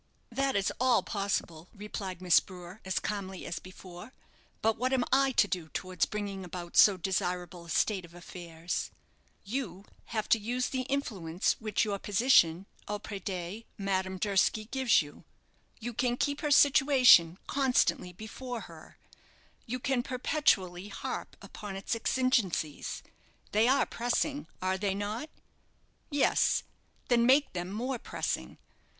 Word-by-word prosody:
"That 270 +2 0
is 200 -1 +1
all 250 -2 +4
possible," 190 -5 -2
replied 195 -3 -6
Miss 180 -3 +6
Brewer, 180 +1 -11
as 190 0 -2
calmly 190 -3 -3
as 170 - -4
before; 185 +4 -12 0.5
"but 225 0 +3
what 255 +3 -1
am 255 -2 +3
I 270 0 +4
to 205 - +4
do 175 -5 -3
towards 185 -1 -1
bringing 200 -2 -4
about 175 -1 -7
so 200 -3 +7
desirable 180 -1 -2
a - - -13
state 190 +4 +1
of 170 0 -14
affairs." 170 -1 -5 0.5
"You 205 -4 -4 0.2
have 215 -2 -3
to 225 - +5
use 245 +4 -1
the 255 -1 -3
influence 195 -11 0
which 215 0 0
your 200 -2 -2
position 195 -5 +4 0.2
auprès 205 -1 -5
de 185 +3 -4
Madame 190 -2 -1
Durski 205 +2 +1
gives 260 -9 +3
you. 145 - -13 0.6
You 240 +1 -5
can 245 +1 0
keep 285 +1 -1
her 300 - -1
situation 265 - +6
constantly 255 -9 +1
before 225 +5 -7
her, - - -13 0.7
you 250 +2 -2
can 260 0 0
perpetually 240 - 0
harp 200 - -6
upon 205 -2 -8
its 195 +4 -2
exigencies 225 - 0 0.5
they 215 +3 +4
are 270 +2 +4
pressing, 275 +5 -1 0.2
are 190 0 0
they 195 -1 0
not? 210 +9 -4 0.8
Yes 290 -3 +2 0.4
then 240 -1 +4
make 270 +4 +4
them 180 0 -4
more 245 +4 -3
pressing. - - -4
205 Hz, 140 wpm, -30 LUFS, 185-250 Hz, 0.8 s, so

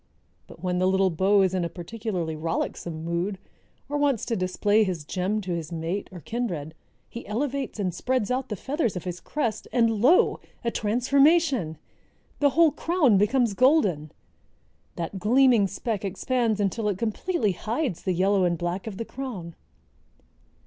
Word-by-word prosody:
But 165 - -14
when 180 -1 0
the 185 - +3
little 190 0 +3
beau 195 +4 +3
is 190 -1 +1
in 185 -2 0
a 170 - -2
particularly 180 -2 -4
rollicksome 160 0 -3
mood, 175 +4 -2 0.5
or 290 +1 -2
wants 280 -6 +1
to 235 - -1
display 205 +3 +2
his 180 -6 -3
gem 190 +6 -1
to 185 -2 -5
his 165 -1 -4
mate 170 +4 -3
or 180 -2 -9
kindred, 170 - -4 0.3
he 235 - -9
elevates 270 +3 -2
and 185 -3 -1
spreads 250 +3 -1
out 260 +1 -1
the 210 - -2
feathers 270 - -2
of 180 - -4
his 180 -1 -5
crest, 230 - -3
and 225 -3 +2
lo! 305 +10 +4 0.2
a 235 - 0
transformation. 255 - +2 0.6
The 285 - +4
whole 320 +3 +4
crown 305 - +2
becomes 235 +1 +2
golden! 195 - +3 0.8
That 170 +3 -4
gleaming 235 0 +4
speck 210 +1 -3
expands 220 +3 0
until 210 +2 0
it 195 - -2
completely 230 - 0
hides 225 - -2
the 185 - -1
yellow 190 +2 +2
and 175 -1 +1
black 175 +4 -3
of 205 -4 -6
the 230 - -4
crown." 220 -12 -6
205 Hz, 165 wpm, -26 LUFS, 180-250 Hz, 0.8 s, lo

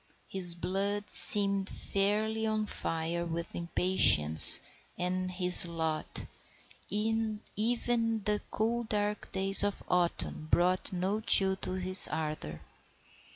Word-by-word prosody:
His 180 -3 +3
blood 200 +4 -6
seemed 200 -1 +3
fairly 215 +3 -5
on 215 0 -5
fire 165 -3 -6
with 170 0 -9
impatience 170 - +7 0.4
at 180 0 -6 0.2
his 180 -1 +1
lot, 160 -2 -7 0.6
and 220 0 -5 0.2
even 230 0 -4
the 210 +1 -3
cool 235 +2 -5
dark 210 -2 -7
days 195 +1 +1
of 205 -1 -6
autumn 175 -3 -5
brought 180 +4 -3
no 190 +3 -6
chill 190 -3 +2
to 185 - -9
his 185 0 +4
ardour. 150 - -9
195 Hz, 110 wpm, -26 LUFS, 175-210 Hz, 0.6 s, impatience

